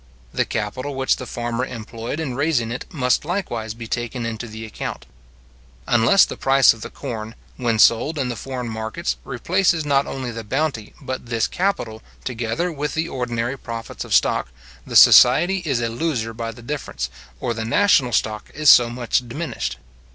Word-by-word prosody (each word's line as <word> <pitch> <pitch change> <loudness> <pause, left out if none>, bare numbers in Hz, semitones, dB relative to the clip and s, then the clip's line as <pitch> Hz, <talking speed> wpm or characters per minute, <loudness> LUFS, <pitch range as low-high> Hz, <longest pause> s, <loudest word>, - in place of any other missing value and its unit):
The - - +1
capital 130 +6 -3
which 135 0 +1
the 130 - -7
farmer 120 +1 -2
employed 115 +2 -5
in 150 -6 -3
raising 135 -4 0
it 125 - -6
must 125 -7 +1
likewise 120 - -3
be 115 0 -8
taken 120 +1 -3
into 115 +1 -4
the 110 0 -8
account. 110 - -6 0.8
Unless 120 +11 +5
the - - -7
price 135 0 +5
of 115 - -14
the - - -6
corn, 115 -4 -6 0.2
when 120 -3 0
sold 120 +8 +4
in 135 -3 0
the 120 - -3
foreign 125 0 -5
markets, 110 +9 -3
replaces 165 +5 +1
not 140 -1 +2
only 130 -2 -4
the 115 0 -6
bounty, 130 -1 -2
but 130 -3 -5
this 115 -1 +1
capital, 145 - -2 0.2
together 125 +8 -2
with 150 -1 -3
the 160 +1 0
ordinary 125 -1 -3
profits 115 -1 -6
of - - 0
stock, - - +2 0.4
the - - -6
society 190 +4 +7
is 135 -5 +1
a 115 - 0
loser 115 -3 -2
by 115 0 -4
the 115 +1 -13
difference, 115 - -4 0.3
or 120 -2 -1
the 110 -1 -4
national 130 - +3
stock 110 -2 -1
is 150 -1 +7
so 120 -1 +6
much 120 0 -1
diminished. 155 +7 -4
120 Hz, 175 wpm, -22 LUFS, 115-140 Hz, 0.8 s, society